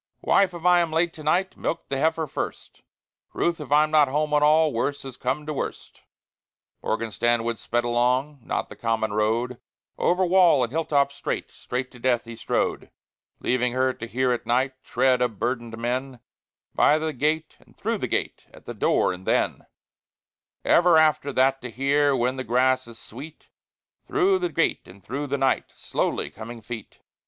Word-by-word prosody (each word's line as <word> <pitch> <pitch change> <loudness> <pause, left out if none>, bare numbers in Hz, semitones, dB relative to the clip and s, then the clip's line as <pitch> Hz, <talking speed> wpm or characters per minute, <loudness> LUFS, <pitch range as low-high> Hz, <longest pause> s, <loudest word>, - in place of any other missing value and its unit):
"Wife, 185 -3 +3
if 170 0 -9
I 180 0 +6
am 170 -2 0
late 165 +1 +1
to 155 - -11
night, 180 +5 +1
Milk 165 - -3
the 135 - -1
heifer 160 +2 +1
first; 145 - -6 0.5
Ruth, 170 -2 0
if 145 - -9
I'm 150 +1 +4
not 150 -2 +5
home 150 +3 -1
at 150 - +4
all, 155 0 +4
Worse 135 +5 -2
has 135 -3 -8
come 135 +4 -2
to 155 - -3
worst." 140 - -6 0.8
Morgan 110 0 -2
Stanwood 115 +2 0
sped 120 +1 -1
along, 125 +4 +1
Not - - -3
the - - -10
common 110 -2 -1
road; 115 +4 0 0.4
Over 185 +1 +2
wall 175 -7 +5
and 120 - -2
hill 160 +2 -1
top 140 -2 +2
straight, 140 - -4
Straight 125 +1 -5
to 125 - -14
death, 120 -1 +1
he 115 0 -8
strode; - - -2 0.5
Leaving 125 -1 +1
her 130 0 +1
to 115 - -8
hear 130 +2 0
at 120 - -2
night 130 +3 +1
Tread 130 -1 +2
of 120 -4 0
burdened 120 0 -3
men, 125 +2 -3 0.5
By 150 - +4
the 155 0 -2
gate 155 +4 -1
and - - -24
through - - -2
the - - -2
gate, - - -3
At - - -17
the - - -6
door, - - +2
and 90 +1 -11
then - - 0 1.0
Ever 175 -1 +5
after 155 -2 +3
that 135 +1 +2
to 125 - -6
hear, 140 +4 +2
When 125 +1 0
the 130 - -3
grass 130 +1 +2
is 115 -1 -12
sweet, 145 +10 -11 0.6
Through 390 -1 +2
the 355 -1 -1
gate 165 - 0
and 95 +1 -15
through 140 +10 -4
the 140 +1 -1
night, 135 -1 +1
Slowly - - -2
coming 115 +1 -9
feet. 115 -1 -8
130 Hz, 185 wpm, -25 LUFS, 120-155 Hz, 1.0 s, I